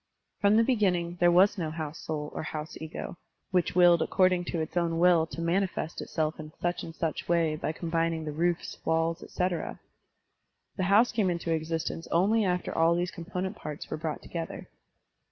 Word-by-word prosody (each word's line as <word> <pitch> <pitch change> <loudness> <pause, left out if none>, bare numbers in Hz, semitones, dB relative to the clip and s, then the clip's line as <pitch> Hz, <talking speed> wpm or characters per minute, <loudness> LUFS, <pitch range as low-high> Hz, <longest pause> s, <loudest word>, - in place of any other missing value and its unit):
From 205 +1 +4
the 230 - +6
beginning 180 -8 +1
there 175 - +5
was 190 +3 +5
no 160 -3 -1
house 155 -1 -5
soul 150 -1 -4
or - - -3
house 155 0 -5
ego, 160 +2 -6 0.3
which 180 -2 +1
willed 175 -2 +6
according 185 0 +2
to 170 - -2
its 160 +1 -4
own 170 -2 +1
will 170 -2 +4
to 165 - -6
manifest 170 -1 -1
itself 155 0 -2
in 155 0 -8
such 175 0 -1
and 165 - -8
such 165 0 -3
way 165 -2 +2
by 155 - -2
combining 165 -1 -1
the 150 - -3
roofs, 170 +3 -1
walls, 165 +1 +1
et - - -11
cetera. 180 -1 -2 1.0
The 185 - -1
house 220 +5 +5
came 210 -5 +1
into 170 -1 -1
existence 160 +1 -3
only 205 +6 +3
after 180 -2 -1
all 165 +1 +4
these 175 +1 -1
component 185 +3 -4
parts 150 -6 -7
were - - -2
brought 155 0 -4
together. 165 -1 -6
170 Hz, 185 wpm, -29 LUFS, 160-180 Hz, 1.0 s, the